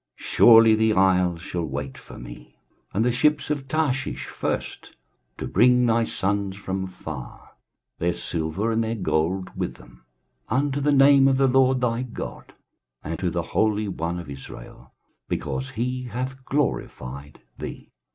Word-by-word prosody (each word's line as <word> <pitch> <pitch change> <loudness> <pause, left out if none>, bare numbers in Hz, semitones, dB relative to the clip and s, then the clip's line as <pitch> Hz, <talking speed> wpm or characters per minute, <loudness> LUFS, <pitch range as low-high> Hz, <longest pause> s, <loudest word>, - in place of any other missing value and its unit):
23:060:009 - - -11
Surely 115 -1 +7
the 110 0 +2
isles 90 -3 +3
shall 85 -1 -3
wait 70 -2 -4
for - - -12
me, - - -11 0.4
and 110 +4 +1
the 125 - +3
ships 145 +4 +1
of 140 -3 -3
Tarshish 140 -2 -1
first, - - -4 0.4
to - - -4
bring 125 +4 +4
thy 115 0 +3
sons 100 -1 -2
from 95 -1 -3
far, 95 - -9 0.5
their 85 +1 +1
silver 85 +6 -2
and 115 0 +1
their 110 +1 -2
gold 90 -1 -1
with - - -3
them, - - -18 0.5
unto 140 +3 0
the 145 +1 +2
name 135 -1 +6
of 135 -1 +3
the 135 0 +4
LORD 130 0 +3
thy 120 -1 0
God, 125 -3 -7 0.5
and - - -4
to - - 0
the - - -2
Holy 105 -1 +2
One 85 -2 -3
of 85 -2 -7
Israel, 70 -3 -11 0.4
because 65 -2 -3
he 125 +3 -3
hath 130 +3 -5
glorified 70 - -3 0.2
thee. - - -8
110 Hz, 155 wpm, -24 LUFS, 85-130 Hz, 0.5 s, Surely